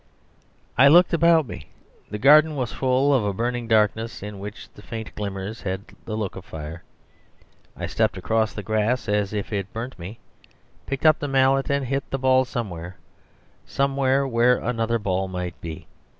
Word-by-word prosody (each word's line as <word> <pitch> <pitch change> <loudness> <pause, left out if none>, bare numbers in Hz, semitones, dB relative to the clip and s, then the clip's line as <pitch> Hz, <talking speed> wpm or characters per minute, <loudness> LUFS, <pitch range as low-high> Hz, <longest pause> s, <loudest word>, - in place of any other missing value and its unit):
I 140 - +8
looked 175 +5 +6
about 165 -1 +4
me. 80 - -9 0.4
The 105 - -4
garden 150 +6 +6
was 125 -5 -3
full 130 +2 +2
of 130 -5 +3
a 100 -1 -1
burning 120 +3 -2
darkness, 110 0 +1
in 105 -1 -7
which 105 +3 -8
the - - -14
faint 110 +1 -7
glimmers 100 +1 -5
had 95 0 -3 0.2
the 110 - -4
look 105 -4 -3
of 95 - -8
fire. 80 0 -8 1.0
I - - -3
stepped - - 0
across 110 -1 0
the 105 - -7
grass 110 +5 0
as 105 -1 0
if 105 0 -4
it 100 -1 -3
burnt 115 -2 -6
me, 95 +7 -8 0.7
picked 135 +2 -4
up 155 -1 +6
the 145 - -3
mallet, 135 +1 +2
and 140 -1 0
hit 135 +2 -2
the 135 - -2
ball 130 0 +3
somewhere 90 -8 -5 0.7
somewhere 135 0 +1
where 125 0 +3
another 115 -1 -1
ball 95 -3 -1
might 90 -2 -5
be. 80 -2 -7
115 Hz, 175 wpm, -24 LUFS, 100-135 Hz, 1.0 s, I